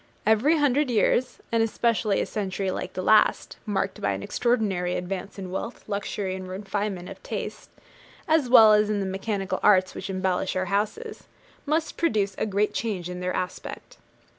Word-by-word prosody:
Every 230 +9 +4
hundred 290 -1 +2
years, 240 +2 +2
and 230 -1 +2
especially 225 -2 +1
a - - 0
century 195 -2 -2
like 185 0 -5
the 185 - -4
last, 215 +2 +3
marked 205 -2 -2
by 100 - +1
an 95 0 -5
extraordinary 200 -7 0
advance 185 +2 -5
in 190 -2 -6
wealth, 225 +5 -5
luxury, 200 -2 -3
and 185 0 -6
refinement 195 -1 -3
of - - -10
taste, - - -6 0.6
as 310 -5 +2
well 220 -4 +8
as 210 0 +3
in 210 -1 0
the 195 - -1
mechanical 195 +1 -2
arts 185 -3 +4
which - - -6
embellish 185 0 -1
our 185 0 0
houses, 325 - -2 0.4
must 315 +2 0
produce 210 -11 +1
a - - 0
great 205 +1 0
change 185 -6 -3
in 180 - -6
their 180 0 -2
aspect. 185 - -6
205 Hz, 170 wpm, -25 LUFS, 185-225 Hz, 0.6 s, well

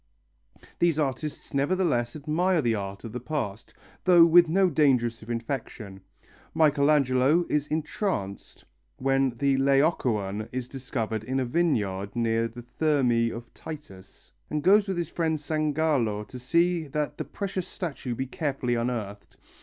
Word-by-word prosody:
These 170 -3 +3
artists 145 0 -3
nevertheless 140 -5 +1
admire 165 +5 +1
the 115 - +2
art 100 -2 -5
of 115 - -7
the 125 - -4
past, 120 -6 -4 0.3
though 175 -2 +7
with 170 0 +6
no 190 +3 +4
danger 140 -8 +3
of 115 -1 -6
infection. 115 -5 -5 0.5
Michelangelo 145 0 +3
is 150 -1 0
entranced 155 - -3 0.3
when 135 -2 +1
the 140 0 +2
Laocoön 125 - +1
is 125 -1 -4
discovered 120 -5 -4
in 130 +4 -2
a 130 - 0
vineyard 110 - 0
near 115 -1 +1
the 120 +1 -11
Thermæ 120 -4 +1
of 115 0 -9
Titus, 100 -12 -11 0.2
and 150 -1 -2
goes 205 +3 +5
with 190 -2 -2
his 170 -2 -2
friend 160 -2 -1
Sangallo 150 -8 0
to 125 - -8
see 170 +5 +1
that 145 +1 -3
the - - -1
precious 190 -2 -4
statue 145 - -5
be 130 - -2
carefully 135 -3 -2
unearthed. 115 -4 -4
135 Hz, 140 wpm, -27 LUFS, 115-155 Hz, 0.5 s, though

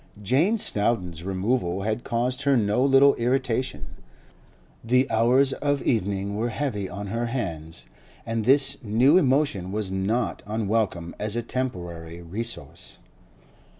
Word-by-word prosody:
Jane 155 - +2
Snowdon's 95 - -1
removal 95 0 -1
had 110 +3 -2
caused 125 +3 -1
her 140 -2 +3
no 105 +3 +2
little 140 +1 +6
irritation; 125 - -1 1.0
the 125 +3 +3
hours 125 +5 +3
of 145 -1 -1
evening 100 -2 0
were 115 +3 -1
heavy 110 -6 -3
on 100 +3 -6
her 115 +3 -2
hands, 85 -10 -4 0.4
and 115 -1 -2
this 135 +2 +3
new 125 - +4
emotion 130 - +1
was 105 -2 -2
not 105 +6 -1
unwelcome 105 -5 -1
as 105 +1 -3
a 120 - -1
temporary 85 -10 -5
resource. 105 +8 -5
115 Hz, 125 wpm, -25 LUFS, 95-130 Hz, 1.0 s, little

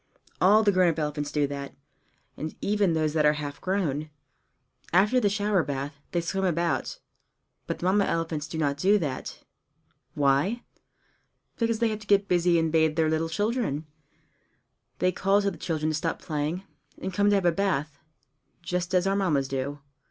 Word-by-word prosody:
All 210 +4 +6
the 205 - +4
grown 185 -2 +4
up 165 - -2
elephants 150 -1 -2
do 150 -1 +1
that, 140 0 -6 0.6
and 155 +1 -5
even 205 -4 +1
those 155 -2 0
that 155 -1 +2
are 150 0 +5
half 145 -1 -6
grown. 155 -6 -1 0.8
After 205 +8 +4
the 210 -4 +2
shower 205 -1 +1
bath, 140 -1 -4
they 175 - 0
swim 195 +3 -2
about; 170 -6 0 0.7
but - - -2
the - - -5
Mamma 195 +2 +3
elephants 160 -2 -2
do 160 - -6
not 145 -3 0
do 195 +8 +4
that. 145 -9 -4 0.7
Why? 145 - +2 1.0
Because 230 -1 +1
they 230 0 +2
have 215 -1 -3
to 210 - -14
get 200 0 +3
busy 175 -1 +3
and 160 -1 +1
bathe 160 -1 +3
their 160 -1 +2
little 160 +1 0
children. 205 - -1 1.1
They 185 - +2
call 195 +3 +2
to 200 - +1
the 175 - -10
children 155 -2 -1
to - - -1
stop 165 +2 -2
playing, 155 +4 -3 0.4
and 190 - -4
come 205 +3 +2
and 205 - +4
have 195 -2 +1
a 175 - +5
bath 155 -6 -1 0.6
just 180 +1 -2
as 180 0 +3
our 195 0 +2
Mammas 155 -9 +1
do. 135 +2 -4
170 Hz, 180 wpm, -27 LUFS, 150-195 Hz, 1.1 s, All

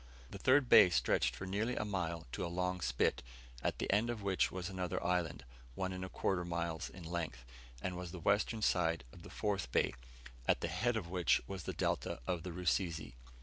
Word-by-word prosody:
The 100 - -7
third 130 +2 +5
bay 90 - +9
stretched 65 -4 +2
for 95 - -6
nearly 105 +6 -1
a - - -1
mile 85 -5 -2
to - - -3
a - - -1
long 90 +1 -1
spit, 60 -5 +1 0.4
at - - 0
the - - 0
end 110 +4 +3
of 115 -4 -3
which 95 -2 +2
was 90 -1 -4
another 90 -2 -3
island, 85 -6 0 0.3
one 95 -1 -2
and 95 0 -4
a 95 - -5
quarter 95 -2 0
mile 85 -2 -2
in 95 - -10
length, 80 -8 -4 0.4
and 90 -1 -2
was 90 0 -5
the 90 - -7
western 105 +5 +1
side 80 -6 +2
of - - -12
the - - -11
fourth 100 - -2
bay, - - +2 0.5
at - - +3
the 85 - -1
head 110 +8 +1
of 85 -5 -5
which 90 -3 +3
was 95 -3 -6
the - - -2
delta - - -1
of 90 +2 -1
the 90 +1 -5
Rusizi. 85 -3 -1
90 Hz, 210 wpm, -35 LUFS, 85-95 Hz, 0.5 s, bay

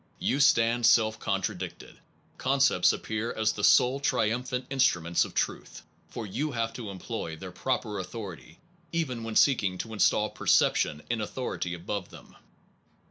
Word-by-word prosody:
You 140 - 0
stand 120 -4 +4
self 110 -2 +4
contradicted: - - -4 0.4
concepts 135 -8 +3
appear 110 +2 -3
as 110 -1 +1
the 105 -1 -6
sole 125 +6 +5
triumphant 125 0 -1
instru 135 -8 +3
ments 85 +1 +1
of - - -11
truth, - - -3 0.3
for 115 - -6
you 140 +9 -3
have 115 -1 -2
to 115 -5 -7
employ 95 -3 -5
their 90 +3 -9
proper 105 0 -2
authority, 95 -4 -8 0.3
even 130 -9 -2
when 115 -1 -5
seeking 100 -10 +3
to 110 +4 -6
install 105 0 +2
perception 75 +1 +2
in 115 -2 -1
authority 105 -5 -4
above 90 +2 -5
them. - - -15
115 Hz, 145 wpm, -28 LUFS, 100-125 Hz, 0.4 s, sole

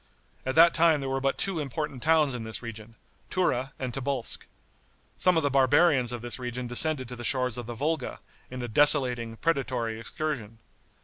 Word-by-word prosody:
At 130 - -1
that 170 +1 +7
time 165 -2 +4
there 135 -1 -4
were 135 0 -1
but 135 0 0
two 190 -4 -1
important 140 -2 -4
towns 155 -2 +3
in 125 - -4
this 110 +2 -6
region, 115 -1 -8 0.3
Tura 135 -8 0
and 130 -2 -4
Tobolsk. 135 -2 -2 0.7
Some 180 -2 +3
of 160 - +2
the 145 - +1
barbarians 135 -1 +4
of 120 -1 -6
this 120 +2 -5
region 125 0 -4
descended 130 +2 +2
to 125 - -7
the 120 - -8
shores 125 -2 0
of 120 -2 -6
the 120 - -5
Volga, 155 +6 -2 0.3
in 125 -1 -6
a - - -3
desolating, 125 -3 +3
predatory 125 -8 -1
excursion. 115 -4 -4
130 Hz, 185 wpm, -27 LUFS, 120-150 Hz, 0.7 s, that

